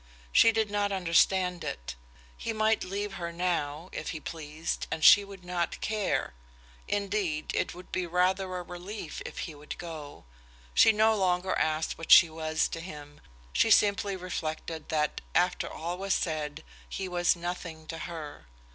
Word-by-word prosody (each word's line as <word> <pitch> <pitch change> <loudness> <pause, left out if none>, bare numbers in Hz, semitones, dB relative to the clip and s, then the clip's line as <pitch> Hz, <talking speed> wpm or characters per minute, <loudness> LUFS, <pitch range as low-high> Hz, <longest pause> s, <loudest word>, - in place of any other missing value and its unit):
She 230 - +7
did 220 -2 0
not 205 -1 +1
understand 180 0 +2
it. - - -5 0.4
He 225 - -4
might 220 0 +2
leave 200 +2 -3
her 170 0 -3
now, 170 -2 -2
if - - -5
he 160 - -4
pleased, 155 0 -4
and 160 - -3
she 205 - +9
would 195 -2 -12
not 175 -1 -2
care; 215 - -1 0.5
indeed, 200 -6 -1
it - - -1
would 180 +1 -12
be 185 -1 -1
rather 180 +2 +2
a 180 - -4
relief 175 0 -7
if - - -10
he 165 - -8
would 150 0 -8
go. 155 - -8 0.5
She 225 - +7
no 220 +1 +4
longer 185 -1 +1
asked 155 0 0
what 165 - -4
she 165 - +9
was 155 0 0
to 165 - -5
him, 150 -4 -10 0.3
she 225 - +3
simply 205 -1 +4
reflected 160 -3 -5
that, 150 -2 0
after - - +2
all 175 +3 -4
was 195 0 +1
said, 155 -2 -2 0.3
he 195 - -4
was 175 0 +2
nothing 170 -2 -6
to 165 +1 -6
her. 155 - -7
175 Hz, 165 wpm, -29 LUFS, 160-195 Hz, 0.5 s, she